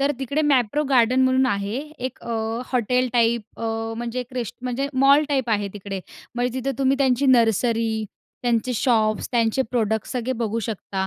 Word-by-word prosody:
तर 280 Hz, +1 st, +2 dB
तिकडे 280 Hz, +3 st, -1 dB
मॅप्रो 255 Hz, +3 st, +2 dB
गार्डन 255 Hz, -1 st, +4 dB
म्हणून 260 Hz, 0 st, +3 dB
आहे 200 Hz, 0 st, -1 dB, 0.2 s
एक 255 Hz, +1 st, -5 dB
अ, 235 Hz, -, -5 dB, 0.4 s
हॉटेल 250 Hz, +1 st, +1 dB
टाईप 230 Hz, -2 st, 0 dB
अ, -, -, -3 dB, 0.3 s
म्हणजे 240 Hz, +1 st, -4 dB
अ, -, -, 0 dB
एक 250 Hz, +1 st, -20 dB
रेस्ट 240 Hz, -4 st, -3 dB
म्हणजे 255 Hz, +2 st, -2 dB, 0.2 s
मॉल 280 Hz, +2 st, +6 dB
टाईप 265 Hz, -4 st, 0 dB
आहे 205 Hz, -2 st, +1 dB
तिकडे. 195 Hz, -1 st, -5 dB, 0.3 s
म्हणजे 245 Hz, +1 st, -1 dB
तिथं 275 Hz, +2 st, -3 dB
तुम्ही 270 Hz, 0 st, +2 dB
त्यांची 270 Hz, 0 st, +2 dB
नर्सरी, 230 Hz, -2 st, +3 dB, 0.5 s
त्यांचे 240 Hz, 0 st, +1 dB
शॉप्स, 215 Hz, -3 st, +1 dB
त्यांचे 235 Hz, +2 st, +2 dB
प्रॉडक्ट्स 220 Hz, -3 st, -1 dB
सगळे 250 Hz, 0 st, -1 dB
बघू 230 Hz, -1 st, -1 dB
शकता. 195 Hz, -3 st, -3 dB
245 Hz, 175 wpm, -23 LUFS, 225-260 Hz, 0.5 s, मॉल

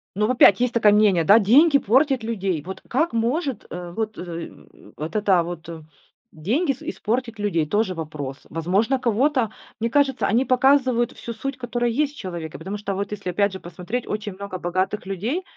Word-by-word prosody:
Но 210 Hz, +2 st, +1 dB
в -, -, +1 dB
опять 220 Hz, -6 st, +6 dB
есть 250 Hz, -1 st, +1 dB
такое 220 Hz, -3 st, +5 dB
мнение, 205 Hz, -5 st, +4 dB
да, 205 Hz, +8 st, +7 dB
деньги 280 Hz, -, +5 dB
портят 265 Hz, +1 st, +2 dB
людей. 195 Hz, -7 st, -2 dB
Вот 190 Hz, +3 st, -8 dB
как 310 Hz, +5 st, 0 dB
может, 245 Hz, -, -1 dB
э, 175 Hz, 0 st, -7 dB
вот, 220 Hz, -1 st, -3 dB
э, 170 Hz, -2 st, -6 dB, 0.5 s
вот 155 Hz, +7 st, -6 dB
это 195 Hz, -5 st, +3 dB
вот 170 Hz, -1 st, -7 dB, 0.6 s
деньги 235 Hz, -, 0 dB
ис 270 Hz, -, -7 dB
испортить 240 Hz, -7 st, -3 dB
людей? 170 Hz, -7 st, 0 dB
Тоже 205 Hz, +3 st, 0 dB
вопрос. 150 Hz, -5 st, -6 dB
Возможно, 195 Hz, -, 0 dB
кого-то, 250 Hz, 0 st, +1 dB, 0.3 s
мне 230 Hz, +1 st, 0 dB
кажется, 275 Hz, 0 st, +2 dB
они 235 Hz, +6 st, +2 dB
показывают 255 Hz, -2 st, +3 dB
всю 235 Hz, -, -7 dB
суть, 275 Hz, +4 st, -5 dB
которая 240 Hz, -1 st, -1 dB
есть 290 Hz, +4 st, 0 dB
в -, -, -17 dB
человеке, 170 Hz, -4 st, -6 dB
потому 190 Hz, +5 st, -5 dB
что 200 Hz, -1 st, -4 dB
вот 200 Hz, +1 st, -3 dB
если, 205 Hz, -3 st, -4 dB
опять 200 Hz, +2 st, +1 dB
же, 190 Hz, -, -6 dB
посмотреть, 180 Hz, +8 st, -5 dB
очень 210 Hz, -1 st, -4 dB
много 200 Hz, 0 st, -6 dB
богатых 185 Hz, +4 st, -2 dB
людей, 215 Hz, -, -3 dB
215 Hz, 185 wpm, -23 LUFS, 185-250 Hz, 0.6 s, да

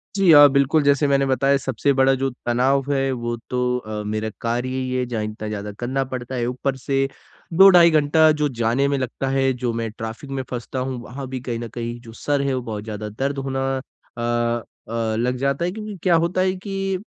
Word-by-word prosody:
जी 195 Hz, -4 st, +5 dB
हाँ, 145 Hz, -1 st, +9 dB
बिल्कुल, 140 Hz, +2 st, +3 dB
जैसे 140 Hz, 0 st, +3 dB
मैंने 140 Hz, 0 st, +3 dB
बताया 135 Hz, +1 st, +2 dB
सबसे 135 Hz, 0 st, 0 dB
बड़ा 135 Hz, 0 st, +4 dB
जो 135 Hz, -, +1 dB, 0.2 s
तनाव 130 Hz, +3 st, +1 dB
है, 135 Hz, -1 st, +1 dB
वो 120 Hz, -2 st, -3 dB
तो 125 Hz, 0 st, 0 dB
अ, 110 Hz, -3 st, -5 dB
मेरा 110 Hz, +1 st, -2 dB
कार्य 120 Hz, +2 st, -1 dB
ही 130 Hz, 0 st, -3 dB
है 125 Hz, 0 st, 0 dB
जहाँ 115 Hz, -3 st, -3 dB
इतना 110 Hz, 0 st, -5 dB
ज़्यादा 105 Hz, -1 st, -4 dB
करना 130 Hz, +3 st, -1 dB
पड़ता 130 Hz, 0 st, -6 dB
है। 120 Hz, -1 st, -1 dB
ऊपर 130 Hz, +2 st, -2 dB
से 135 Hz, +1 st, 0 dB, 0.5 s
2 190 Hz, +4 st, +8 dB
ढाई 175 Hz, -2 st, +7 dB
घंटा 155 Hz, +1 st, +4 dB
जो 150 Hz, -1 st, +1 dB
जाने 120 Hz, +5 st, +2 dB
में 140 Hz, -, 0 dB
लगता 130 Hz, +1 st, -3 dB
है, 135 Hz, 0 st, +2 dB
जो 125 Hz, -1 st, -2 dB
मैं 115 Hz, 0 st, -2 dB
ट्रैफिक 115 Hz, +5 st, -7 dB
में 135 Hz, -1 st, -2 dB
फँसता 125 Hz, +1 st, -4 dB
हूँ, 130 Hz, 0 st, -3 dB
वहाँ 130 Hz, +2 st, -7 dB
भी 130 Hz, 0 st, -5 dB
कहीं 120 Hz, -2 st, -4 dB
ना 120 Hz, -, -5 dB
कहीं 120 Hz, +1 st, -5 dB
जो 115 Hz, -2 st, -12 dB
सर 145 Hz, +4 st, -1 dB
है, 140 Hz, -1 st, 0 dB
वो 130 Hz, -, -1 dB
बहुत 110 Hz, -3 st, -5 dB
ज़्यादा 105 Hz, -1 st, -5 dB
दर्द 135 Hz, +6 st, -3 dB
होना 135 Hz, 0 st, -2 dB, 0.2 s
अ, 130 Hz, -2 st, -12 dB, 0.7 s
अ, 115 Hz, -1 st, -1 dB
लग 125 Hz, +2 st, 0 dB
जाता 140 Hz, +5 st, 0 dB
है 180 Hz, -, -1 dB
क्योंकि 210 Hz, 0 st, -7 dB
क्या 180 Hz, -3 st, +4 dB
होता 180 Hz, +2 st, 0 dB
है 185 Hz, 0 st, +2 dB
कि, 195 Hz, 0 st, -3 dB
130 Hz, 220 wpm, -22 LUFS, 120-140 Hz, 0.7 s, हाँ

